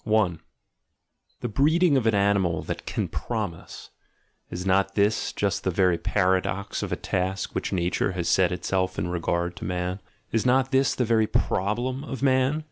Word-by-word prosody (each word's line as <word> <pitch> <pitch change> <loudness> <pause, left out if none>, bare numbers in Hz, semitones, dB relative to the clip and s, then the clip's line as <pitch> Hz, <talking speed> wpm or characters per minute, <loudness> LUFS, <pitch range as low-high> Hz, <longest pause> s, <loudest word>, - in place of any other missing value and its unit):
The - - -2
breeding 150 - +3
of 125 -4 +2
an 110 - +3
animal 100 -5 +2
that - - -6
can - - -1
promise 105 -8 -5 0.3
— - - -44
is 90 +1 -5
not 95 0 +2
this 105 +1 +1
just 100 -1 -1
that 95 -2 -1
very 90 -3 +3
paradox 95 0 0
of - - -4
a - - +1
task 95 +1 -2
which - - -2
nature 90 0 0
has 90 -2 -3
set 95 -2 +3
itself 95 +1 -1
in 90 - -2
regard 85 0 -1
to - - -8
man? 90 +1 -2 0.3
Is 115 - +1
not 130 +1 +2
this 135 -1 +2
the 125 - +1
very 110 -1 +2
problem 120 +10 -1
of 135 -3 -6
man? 130 +2 +3
100 Hz, 170 wpm, -25 LUFS, 90-125 Hz, 0.3 s, breeding